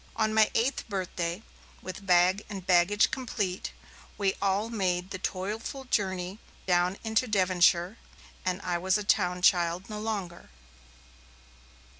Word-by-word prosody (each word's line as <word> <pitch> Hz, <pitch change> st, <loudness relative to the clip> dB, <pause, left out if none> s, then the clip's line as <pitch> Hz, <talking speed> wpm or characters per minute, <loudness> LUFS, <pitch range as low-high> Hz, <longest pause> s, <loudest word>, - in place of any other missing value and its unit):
On 215 Hz, -1 st, +1 dB
my 220 Hz, -1 st, +5 dB
eighth 240 Hz, +1 st, 0 dB
birthday, 180 Hz, -1 st, -3 dB, 0.4 s
with 190 Hz, +2 st, -8 dB
bag 180 Hz, +3 st, +4 dB
and 195 Hz, -4 st, -7 dB
baggage 185 Hz, +3 st, +4 dB
complete, 205 Hz, -7 st, -3 dB, 0.5 s
we 195 Hz, -2 st, +1 dB
all 200 Hz, +3 st, 0 dB
made 185 Hz, -3 st, -1 dB
the 190 Hz, -, -4 dB
toilful 210 Hz, +9 st, -4 dB
journey 190 Hz, -4 st, -1 dB, 0.3 s
down 180 Hz, +1 st, +2 dB
into 220 Hz, +2 st, +1 dB
Devonshire, 185 Hz, -1 st, +2 dB, 0.4 s
and 185 Hz, 0 st, -1 dB
I 175 Hz, -1 st, -1 dB
was 190 Hz, +3 st, +2 dB
a 210 Hz, -, -4 dB
town 180 Hz, -2 st, +1 dB
child 175 Hz, +2 st, +2 dB
no 210 Hz, -, -4 dB
longer. 200 Hz, -6 st, -4 dB
190 Hz, 130 wpm, -28 LUFS, 180-210 Hz, 0.5 s, my